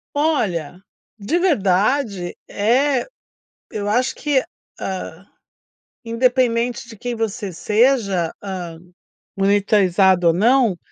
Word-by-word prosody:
Olha, 200 - 0 0.4
de 210 +12 -1
verdade 210 - +1
eh, 250 +5 +1 0.6
eu 205 -1 -4
acho 250 +5 +1
que, 290 -3 +1 0.4
hã, 190 -1 -6 0.8
independentemente 240 0 0
de 225 - -11
quem 245 +3 -4
você 215 -4 -3
seja, 210 -3 +1
hã, 180 -4 -6 0.6
monitorizado 195 -2 +3
ou 165 - +5
não, 230 +1 +3
210 Hz, 95 wpm, -20 LUFS, 190-250 Hz, 0.8 s, ou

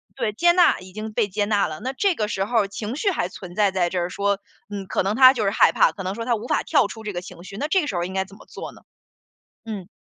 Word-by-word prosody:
对， 230 -5 -1
接 345 +11 +4
纳， 350 0 +5
已 185 0 -13
经 215 +1 -5
被 210 - +1
接 205 +1 -1
纳 205 -1 +2
了， 155 0 -6
那 260 - -3
这 380 +8 +1
个 215 -10 -2
时 195 -2 -1
候 220 -2 +1
情 210 +4 -5
绪 395 +8 +1
还 240 - -1
存 180 -1 -10
在 205 -1 +3
在 180 -2 +1
这 185 - -3
儿 175 +1 -2
说， 200 +1 0 0.3
嗯， 200 -2 -5
可 - - 0
能 195 +3 0
他 260 0 +8
就 230 -5 -2
是 195 - +2
害 200 - +4
怕， - - +4
可 195 - -8
能 185 - -2
说 230 +3 -5
他 240 0 +1
无 225 +2 -6
法 - - +1
跳 245 - +3
出 220 +1 -9
这 210 - -4
个 175 - -3
情 175 -1 -11
绪， 195 +2 -9
那 290 - -2
这 370 +4 +3
个 295 - -4
时 - - -3
候 175 - 0
应 185 - -5
该 190 0 0
怎 195 +1 -15
么 - - -16
做 - - -8
呢？ - - -17 0.9
嗯。 200 -5 -6
205 Hz, 330 characters per minute, -23 LUFS, 190-235 Hz, 0.9 s, 他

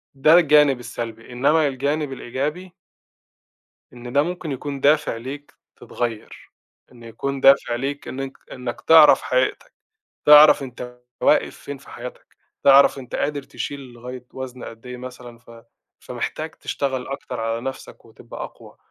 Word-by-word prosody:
ده 150 +4 +4
الجانب 150 -5 +4
السلبي، 115 -1 -7
إنّما 145 +5 +2
الجانب 140 +2 -2
الإيجابي 150 +9 -5 1.2
إن 120 0 -10
ده 140 +1 +4
ممكن 175 -2 -5
يكون 140 +1 -5
دافع 150 -4 +2
ليك، 135 +5 -9 0.2
تتغيّر، 115 -2 -6 0.4
إن 120 -2 -16
يكون 135 +4 -5
دافع 135 -3 +5
ليك 140 +3 -4
إنّك 135 0 -6
إنّك 125 -2 -6
تعرف 160 -2 +7
حقيقتك، 130 0 -1 0.5
تعرف 150 0 +8
أنت 125 -1 -9 0.2
واقف - - +2
فين 140 -1 -8
في 140 - -19
حياتك، 125 +1 -10 0.3
تعرف 140 0 +6
أنت 130 -2 -10
قادر 145 -1 -2
تشيل 140 +1 -6
لغاية 125 -1 -10
وزن 130 -1 -8
قد 115 +1 -11
إيه 125 0 -7
مثلًا 125 -1 -10
ف 120 0 -20 0.5
فمحتاج - - -5
تشتغل 130 -2 -4
أكتر 135 -4 -6
على 115 +1 -2
نَفْسك 135 +2 -8
وتبقى - - -10
أقوى، - - -13
135 Hz, 140 wpm, -22 LUFS, 125-145 Hz, 1.2 s, تعرف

